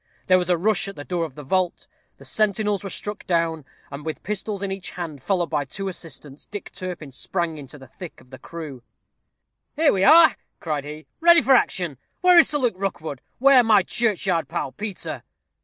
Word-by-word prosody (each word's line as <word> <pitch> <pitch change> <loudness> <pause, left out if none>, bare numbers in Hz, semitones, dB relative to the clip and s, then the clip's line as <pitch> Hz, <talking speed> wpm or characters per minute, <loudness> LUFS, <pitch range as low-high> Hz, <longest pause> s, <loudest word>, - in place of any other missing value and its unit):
There 185 0 +5
was 180 0 -3
a 175 - +3
rush 200 +2 +1
at 195 - -7
the 145 - -8
door 170 +1 -2
of 145 -5 -10
the 150 - -9
vault. 180 +5 -1 0.3
The - - -13
sentinels 210 -1 0
were 195 - -5
struck 205 +2 -6
down; 165 -4 0 0.3
and 140 +1 -7
with 160 0 -5
pistols 205 0 -4
in 195 - -2
each 195 -1 -5
hand, 170 -2 -5
and 140 -3 -14
followed 180 -4 -1
by 150 -2 0
two 195 +8 -6
assistants, 155 -5 -8
Dick 205 -1 -8
Turpin 175 -6 -7
sprang 165 +3 -3
into 140 +1 -11
the 135 - -13
thick 175 +4 -11
of 125 - -21
the 130 - -10
crew. 155 -7 -8 0.9
"Here 310 0 +4
we 190 - +1
are," 325 +6 +7 0.2
cried 150 -4 -3
he, 150 +1 -8
"ready 340 -2 +7
for 265 +3 +5
action. 175 - +1 0.2
Where 360 -1 +7
is 335 - +5
Sir 300 - +1
Luke 245 -6 +1
Rookwood? 160 -8 -4 0.2
where 270 0 +6
my 215 -4 +4
churchyard 195 -7 0
pal, 135 - -3
Peter?" 200 - -5
180 Hz, 205 wpm, -23 LUFS, 155-210 Hz, 0.9 s, are